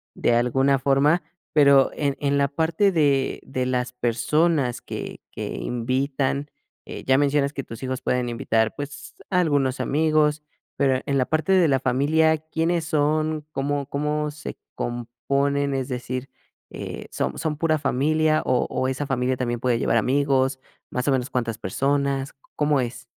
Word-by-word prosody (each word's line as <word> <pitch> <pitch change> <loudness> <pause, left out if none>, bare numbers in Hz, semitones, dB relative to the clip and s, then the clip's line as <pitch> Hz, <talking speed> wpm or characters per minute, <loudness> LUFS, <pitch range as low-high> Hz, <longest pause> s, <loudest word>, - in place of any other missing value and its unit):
de 120 - +2
alguna 135 +3 +2
forma, 140 +5 +3 0.3
pero 140 -3 +6
en 140 -2 -1
en 140 -1 +1
la 140 - +3
parte 160 +7 +1
de 140 -5 +1
de 130 -1 -3
las 125 -1 -1
personas 125 +3 +1
que - - -6
que - - -5
invitan, 135 +3 -1 0.4
eh, - - -8
ya 130 0 +4
mencionas 145 0 +2
que 135 - -4
tus 115 +2 -9
hijos 130 -1 -3
pueden 125 -1 0
invitar, 110 -1 0
pues, 145 0 -8
a 180 - +2
algunos 140 -5 +1
amigos, 155 0 +2 0.4
pero 130 -2 +2
en 140 -1 0
la 130 - +2
parte 155 +6 0
de 180 -4 +5
la 135 -2 +2
familia, 155 +5 +2
¿quiénes 160 +2 -1
son? 155 0 0
¿Cómo 140 0 -2
cómo 150 +1 -1
se 145 0 -8 0.2
componen? 140 +4 -1
Es 130 -1 -2
decir, 130 +1 -4 0.4
eh, - - -6
¿son - - -2
son 155 -2 -2
pura 155 -1 +2
familia 155 +3 +2
o 125 - +2
o 130 - -1
esa 130 +2 -2
familia 130 -1 0
también 120 -2 -2
puede 120 -1 +1
llevar - - +2
amigos? 135 +1 +2 0.3
¿Más 125 +3 -2
o - - +4
menos 130 -1 0
cuántas 115 -3 -1
personas? 140 +5 0
¿C - - -23 0.2
cómo 150 -2 +2
es? 120 0 -5
140 Hz, 165 wpm, -24 LUFS, 130-150 Hz, 0.4 s, pero